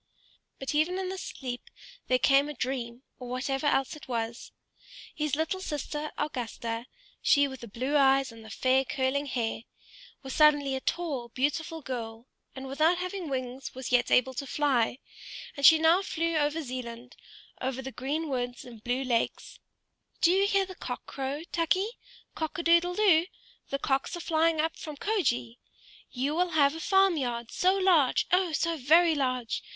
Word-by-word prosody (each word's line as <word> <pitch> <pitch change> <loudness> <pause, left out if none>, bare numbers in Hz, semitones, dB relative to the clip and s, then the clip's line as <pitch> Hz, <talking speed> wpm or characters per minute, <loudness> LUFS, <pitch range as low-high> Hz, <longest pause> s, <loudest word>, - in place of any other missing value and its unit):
But 270 - -4
even 315 +5 +1
in 380 -1 -2
this 380 0 -5
sleep 250 -2 -6 0.4
there 255 - +3
came 275 +3 +4
a 300 - -6
dream, 245 -1 -4 0.2
or 250 -1 -8
whatever 270 +3 -1
else 270 -1 +1
it 300 - -12
was: 230 -1 -4 0.6
his 300 -3 -1
little 320 +5 -1
sister 300 -3 -4
Augusta, 235 -4 -4 0.3
she 285 -1 +4
with 265 -1 -8
the 235 - -9
blue 255 +7 -2
eyes 270 -2 +4
and 225 -1 -13
the 220 - -11
fair 260 +4 +2
curling 270 +2 -1
hair, 235 -4 -2 0.6
was 265 - -6
suddenly 290 -3 +4
a 265 - -3
tall, 285 -9 -2
beautiful 305 +5 -2
girl, 230 -3 -5 0.3
and 265 0 -7
without 310 +6 +2
having 365 -2 -4
wings 255 0 -4
was 260 0 -6
yet 245 -1 +3
able 260 +1 +3
to 275 +2 -5
fly; 260 -6 +1 0.6
and 280 - +6
she 320 - +9
now 325 +4 +4
flew 335 -3 -1
over 305 +1 +1
Zealand 245 -1 -7 0.5
over 265 0 -2
the 265 - -6
green 295 +6 -3
woods 245 -3 -3
and 235 -3 -11
the - - -28
blue 245 +3 -1
lakes. 240 -3 -2 0.6
"Do 340 - +5
you 390 +2 +3
hear 395 -2 +2
the 375 - -9
cock 250 -8 -6
crow, 275 +3 -4
Tukey? 375 +7 0 0.3
Cock 315 +1 -4
a 340 - -2
doodle 340 +1 +4
doo! 360 -5 +4 0.4
The 275 - -1
cocks 275 +5 -1
are - - -7
flying 330 -1 +1
up 320 +1 0
from 305 -3 -7
Kjoge! 250 - -1 0.5
You 270 +4 -2
will 355 +2 +1
have 280 -1 +5
a 325 - -6
farm 385 +1 +3
yard, 240 -4 -3
so 370 +1 +2
large, 360 -9 +3
oh! 365 -1 +3
so 335 +1 0
very 320 +5 +5
large! 255 -5 -1
280 Hz, 175 wpm, -28 LUFS, 255-325 Hz, 0.6 s, she